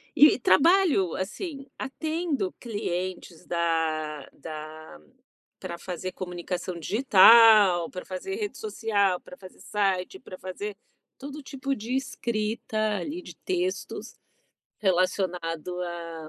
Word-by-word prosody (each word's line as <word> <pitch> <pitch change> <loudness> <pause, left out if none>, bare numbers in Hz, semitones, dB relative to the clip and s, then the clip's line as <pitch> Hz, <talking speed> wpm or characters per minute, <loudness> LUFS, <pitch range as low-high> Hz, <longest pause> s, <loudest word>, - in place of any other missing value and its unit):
e 295 -3 +7
trabalho, 295 - +4
assim, 275 - -5
atendo 305 - -2
clientes 185 -6 -4
da 160 -3 -1
da 155 - -9 0.6
pra 170 -2 -6
fazer 185 0 -5
comunicação 180 -1 -5
digital, 215 -4 +7
pra 180 - -7
fazer 190 - -5
rede 415 -1 -4
social, 205 - 0
pra 180 - -12
fazer 185 -1 -14
site, 195 - -1
pra 185 - -11
fazer 200 +2 -6 0.4
todo 285 +2 -8
tipo 275 0 -3
de 235 +4 -4
escrita 225 -4 -2 0.2
ali, 300 - -5
de - - -11
textos 370 0 -3 0.6
relacionado 180 -2 0
a 165 -2 -6
190 Hz, 105 wpm, -27 LUFS, 175-265 Hz, 0.6 s, e